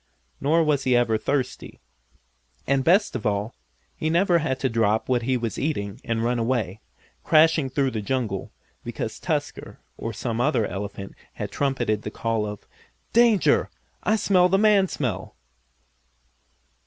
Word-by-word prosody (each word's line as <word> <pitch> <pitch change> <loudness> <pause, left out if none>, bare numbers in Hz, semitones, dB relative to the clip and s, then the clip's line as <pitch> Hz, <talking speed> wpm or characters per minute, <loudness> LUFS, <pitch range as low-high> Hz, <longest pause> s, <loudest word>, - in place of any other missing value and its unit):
Nor 160 +4 +3
was 145 -3 +1
he 130 -1 +2
ever 120 -2 +3
thirsty. 130 +2 -3 0.9
And, 135 -1 +1
best 190 +5 +3
of 110 - -2
all, 105 +2 -1 0.4
he 155 - -2
never 175 +1 +3
had 135 -4 -2
to 135 - +2
drop 110 -2 +1
what 125 -2 +1
he 130 +2 0
was 115 -2 -4
eating 115 -6 -3
and 115 -2 -1
run 120 +1 0
away, 115 -4 -1 0.4
crashing 160 -3 +4
through 135 0 0
the 110 - -3
jungle, 105 -3 -2 0.3
because - - -5
Tusker, - - -3 0.2
or 115 - -3
some 115 +1 -3
other 120 -5 +2
elephant 100 0 -6 0.2
had - - -5
trumpeted 130 -7 0
the - - -5
call 115 -2 -2
of: 105 -1 -8 0.5
"Danger! 230 -4 +4 0.3
I 215 - +2
smell 185 -4 +3
the 195 - +3
man 205 -2 +4
smell!" 125 - -4
130 Hz, 150 wpm, -24 LUFS, 110-155 Hz, 0.9 s, crashing